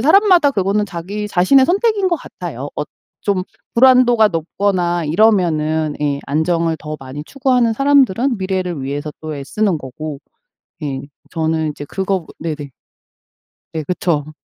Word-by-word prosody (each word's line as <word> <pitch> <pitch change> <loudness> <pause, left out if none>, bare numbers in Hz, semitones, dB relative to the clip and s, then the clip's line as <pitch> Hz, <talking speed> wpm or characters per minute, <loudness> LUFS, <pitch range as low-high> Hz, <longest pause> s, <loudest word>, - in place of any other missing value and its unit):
사람마다 345 - +5
그거는 205 0 +1
자기 195 +4 -5
자신의 210 +9 +4
선택인 400 +2 +2
것 345 - +1
같아요. - - -7
어 - - -1 0.4
좀 195 -3 0 0.3
불안도가 245 -2 +6
높거나 175 0 -1
이러면은 160 -4 +2
예 145 -1 0
안정을 165 +2 +1
더 155 0 -6
많이 135 +2 -7
추구하는 255 - +1
사람들은 270 -2 +3
미래를 185 -5 -2
위해서 145 +2 -4
또 155 -2 -5
애쓰는 175 +6 -1
거고 145 +2 -7 0.6
예 135 -3 -3 0.3
저는 160 -1 0
이제 145 0 -8
그거보 190 -1 -2
네네. 150 -3 -5 1.0
네. 160 - -2
그쵸. 155 -4 -1
180 Hz, 300 characters per minute, -18 LUFS, 155-225 Hz, 1.0 s, 불안도가